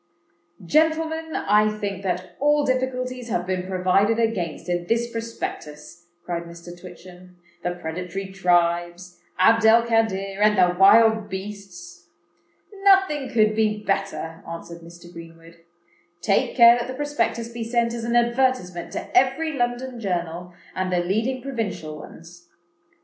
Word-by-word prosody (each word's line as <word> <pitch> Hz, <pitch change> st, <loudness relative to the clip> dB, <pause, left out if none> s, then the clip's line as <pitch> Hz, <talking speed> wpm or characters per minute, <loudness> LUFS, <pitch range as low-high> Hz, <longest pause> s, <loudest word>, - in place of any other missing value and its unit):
"Gentlemen, 320 Hz, -, +1 dB
I 210 Hz, +1 st, +3 dB
think 200 Hz, -2 st, -4 dB
that 185 Hz, -1 st, -4 dB
all 295 Hz, +1 st, +2 dB
difficulties 255 Hz, -1 st, -2 dB
have 175 Hz, -4 st, -1 dB
been 185 Hz, 0 st, -3 dB
provided 190 Hz, +4 st, +2 dB
against 205 Hz, -10 st, -2 dB
in 175 Hz, -1 st, -2 dB
this 230 Hz, +3 st, +1 dB
Prospectus," 175 Hz, -8 st, -7 dB, 0.2 s
cried 170 Hz, -1 st, -4 dB
Mr. 170 Hz, 0 st, -12 dB
Twitchem:—"the 180 Hz, 0 st, -10 dB
predatory 180 Hz, +3 st, -5 dB
tribes, 175 Hz, -1 st, 0 dB, 0.2 s
Abd 225 Hz, +5 st, +4 dB
el 230 Hz, +1 st, +6 dB
Kadir, 200 Hz, -4 st, 0 dB
and 210 Hz, -1 st, +4 dB
the 180 Hz, -1 st, +3 dB
wild 220 Hz, +3 st, +5 dB
beasts." 190 Hz, -3 st, -9 dB, 0.8 s
"Nothing 385 Hz, -8 st, +3 dB
could 215 Hz, -2 st, +2 dB
be 215 Hz, -1 st, 0 dB
better," 195 Hz, -5 st, -3 dB
answered 170 Hz, 0 st, -8 dB
Mr. 170 Hz, +1 st, -14 dB
Greenwood. 165 Hz, 0 st, -13 dB, 0.6 s
"Take 195 Hz, +3 st, 0 dB
care 235 Hz, 0 st, +8 dB
that 240 Hz, -, -4 dB
the 255 Hz, -, -6 dB
Prospectus 290 Hz, -5 st, -2 dB
be 235 Hz, 0 st, -6 dB
sent 235 Hz, 0 st, 0 dB
as 235 Hz, -1 st, -5 dB
an 235 Hz, +1 st, -1 dB
advertisement 235 Hz, -7 st, 0 dB
to -, -, -6 dB
every 270 Hz, +6 st, +2 dB
London 245 Hz, -1 st, -2 dB
journal, 175 Hz, -3 st, -3 dB, 0.2 s
and 185 Hz, 0 st, -2 dB
the 180 Hz, -, +1 dB
leading 225 Hz, +8 st, -1 dB
provincial 220 Hz, -, -4 dB
ones. 175 Hz, +3 st, -13 dB
195 Hz, 135 wpm, -23 LUFS, 175-235 Hz, 0.8 s, care